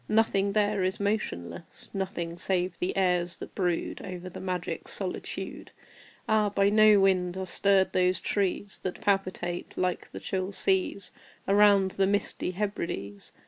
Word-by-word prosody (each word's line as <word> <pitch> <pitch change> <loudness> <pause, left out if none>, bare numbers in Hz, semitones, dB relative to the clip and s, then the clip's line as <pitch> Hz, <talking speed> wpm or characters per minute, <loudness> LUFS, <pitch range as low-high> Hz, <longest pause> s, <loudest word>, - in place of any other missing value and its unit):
Nothing 200 -2 +2
there 205 -2 +2
is 185 +2 -1
motionless 145 - -3
Nothing 185 -4 -3
save 180 0 -1
the 180 - -2
airs 180 -2 +1
that - - -9
brood 175 -3 -1
Over 185 -1 -7
the - - -8
magic 180 -2 -4
solitude. - - -3 0.6
Ah, 215 -1 +3
by 200 0 +2
no 215 -1 +6
wind 185 -2 +2
are 190 - -3
stirred 195 +1 +2
those 180 0 +2
trees 200 0 -1
That 185 - -4
palpitate 185 -3 -1
like 180 -1 -1
the - - -8
chill 190 +1 -3
seas 190 0 0 0.4
Around 200 -1 +5
the 195 0 +1
misty 200 -2 0
Hebrides! 170 - -4
190 Hz, 140 wpm, -28 LUFS, 180-200 Hz, 0.6 s, no